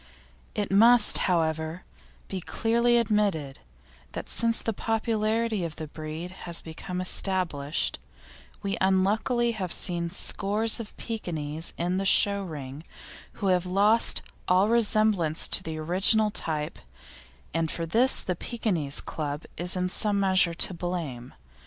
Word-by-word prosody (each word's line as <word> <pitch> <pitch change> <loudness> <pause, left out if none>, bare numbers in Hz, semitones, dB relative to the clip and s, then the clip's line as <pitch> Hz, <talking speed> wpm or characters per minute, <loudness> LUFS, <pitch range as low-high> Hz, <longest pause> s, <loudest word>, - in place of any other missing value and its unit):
It 205 -2 -3
must, 230 +3 +6
however, 160 0 -1 0.4
be 190 -2 -5
clearly 235 +5 +1
admitted 205 -11 0 0.5
that - - -7
since 230 0 +3
the 225 - -2
popularity 220 -1 -1
of 165 -2 -5
the 160 - -6
breed 155 +3 -7 0.2
has 170 - +2
become 180 +3 -7
established 180 -6 -1 0.6
we 200 0 -2
unluckily 215 +5 +1
see 170 -1 -2
scores 210 +5 +4
of 220 -2 -9
Pekinese 160 -8 -4
in 175 +2 -1
the 195 - -2
show 200 +1 +3
ring 150 -5 -8 0.5
who 200 - -4
have 180 -1 +1
lost 205 +5 +3 0.2
all 185 +3 +3
resemblance 215 -8 +2
to - - +4
the 160 -1 -6
original 195 +7 +2
type, 155 -6 -3 0.7
and 165 0 -1
for 165 - -4
this 235 +10 +4
the 180 - -3
Pekinese 170 - -2
Club 150 -1 -5
is 175 +2 0
in 180 0 -1
some 205 +2 0
measure 185 -3 +3
to 185 - +2
blame. 165 -9 -6
185 Hz, 130 wpm, -26 LUFS, 165-215 Hz, 0.7 s, must